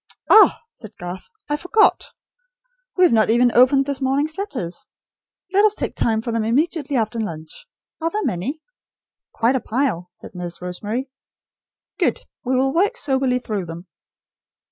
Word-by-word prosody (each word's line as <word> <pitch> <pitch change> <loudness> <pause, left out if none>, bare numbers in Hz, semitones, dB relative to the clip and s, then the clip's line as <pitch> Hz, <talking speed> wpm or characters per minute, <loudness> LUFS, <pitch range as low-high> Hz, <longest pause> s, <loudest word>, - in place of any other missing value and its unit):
"Ah," 430 - +7
said 215 -3 -13
Garth, 175 +1 -7 0.2
"I 295 - -1
forgot. 390 +7 +3 0.9
We 365 - +5
have 350 - +5
not 220 -1 +3
even 240 +2 +4
opened 265 +2 +5
this 280 -1 -4
morning's 280 +4 0
letters. 255 - -4 0.7
Let 400 +2 +5
us 425 -1 +4
take - - -3
time 220 -1 +1
for 235 - -3
them 230 -1 0
immediately 285 +4 0
after 230 0 -1
lunch. 160 -7 -7 0.3
Are 330 - 0
there 425 +5 -2
many?" 255 - -3 0.7
"Quite 235 +3 +1
a - - +2
pile," 220 -8 -2
said - - -12
Nurse 175 -1 -5
Rosemary. 210 +9 -4 0.9
"Good. - - +1 0.2
We 260 0 0
will 270 +1 +1
work 410 +8 +1
soberly 265 - +1
through 210 -7 -4
them." 165 +2 -8
250 Hz, 155 wpm, -21 LUFS, 210-295 Hz, 0.9 s, Ah